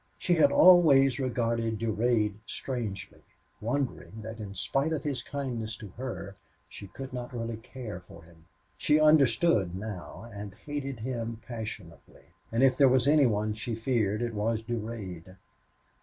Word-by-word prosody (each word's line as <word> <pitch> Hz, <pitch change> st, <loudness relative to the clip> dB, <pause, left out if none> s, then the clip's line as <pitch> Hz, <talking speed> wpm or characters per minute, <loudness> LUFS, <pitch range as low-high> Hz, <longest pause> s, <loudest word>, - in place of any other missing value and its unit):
She 175 Hz, -, +1 dB
had 160 Hz, -, +5 dB
always 145 Hz, -8 st, +7 dB
regarded 115 Hz, -3 st, 0 dB
Durade 110 Hz, -1 st, +1 dB
strangely, 115 Hz, -7 st, -5 dB, 0.4 s
wondering 115 Hz, -2 st, -3 dB
that 110 Hz, +1 st, -7 dB
in 100 Hz, -2 st, -7 dB
spite 135 Hz, -, 0 dB
of 145 Hz, -3 st, -2 dB
his 140 Hz, -5 st, -2 dB
kindness 120 Hz, -7 st, -4 dB
to 105 Hz, -, -9 dB
her 115 Hz, -3 st, -6 dB, 0.3 s
she 100 Hz, -, -10 dB
could 130 Hz, +6 st, -8 dB
not 125 Hz, -1 st, -5 dB
really 115 Hz, -2 st, -4 dB
care 115 Hz, -4 st, -8 dB
for 85 Hz, -2 st, -15 dB
him. 80 Hz, 0 st, -20 dB, 0.3 s
She 150 Hz, -, +3 dB
understood 150 Hz, -, +4 dB
now 100 Hz, +1 st, -7 dB
and 100 Hz, -1 st, -7 dB
hated 140 Hz, -1 st, -5 dB
him 115 Hz, -2 st, -3 dB
passionately. 110 Hz, -7 st, -8 dB, 0.3 s
And 115 Hz, +3 st, +2 dB
if 135 Hz, -1 st, +5 dB
there 140 Hz, -2 st, +6 dB
was 130 Hz, 0 st, +3 dB
any 145 Hz, -2 st, +6 dB
one 105 Hz, -1 st, 0 dB
she 115 Hz, +2 st, -4 dB
feared 115 Hz, -2 st, 0 dB
it 120 Hz, -1 st, -2 dB
was 110 Hz, +1 st, -1 dB
Durade. 105 Hz, -6 st, -6 dB
115 Hz, 150 wpm, -29 LUFS, 105-130 Hz, 0.4 s, always